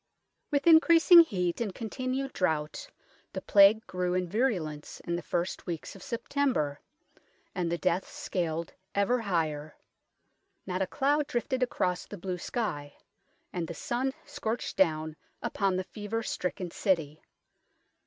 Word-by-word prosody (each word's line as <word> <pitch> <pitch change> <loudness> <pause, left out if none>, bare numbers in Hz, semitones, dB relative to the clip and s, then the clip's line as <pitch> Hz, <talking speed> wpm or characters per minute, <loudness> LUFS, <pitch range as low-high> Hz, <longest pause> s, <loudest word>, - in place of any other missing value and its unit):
With 285 -2 0
increasing 335 +1 +8
heat 185 - +2
and 205 -5 -2
continued 255 +4 -3
drought, 155 -4 -1 0.4
the - - -4
Plague 205 +2 +6
grew 180 -1 -1
in 185 -1 0
virulence 175 - -1
in 170 - -2
the 175 - -3
first 175 +4 -3
weeks 170 +1 -5
of 195 - -12
September, 235 - -1 0.7
and 175 -2 -1
the 170 - 0
deaths 180 +1 0
scaled 170 -2 -3 0.2
ever 200 +5 +2
higher. 155 -7 -1 0.9
Not 185 0 -2
a 190 - +1
cloud 290 +4 +1
drifted 255 +2 -1
across 180 -7 0
the 205 - -8
blue 180 0 -4
sky, 150 - -3 0.6
and 175 -2 -2
the 170 - -6
sun 255 +7 -1
scorched 225 +2 -3
down 160 -3 +1 0.2
upon 195 -2 0
the 185 - -1
fever 215 +3 -4
stricken 180 -3 -3
city. 160 -7 0
185 Hz, 135 wpm, -29 LUFS, 170-240 Hz, 0.9 s, increasing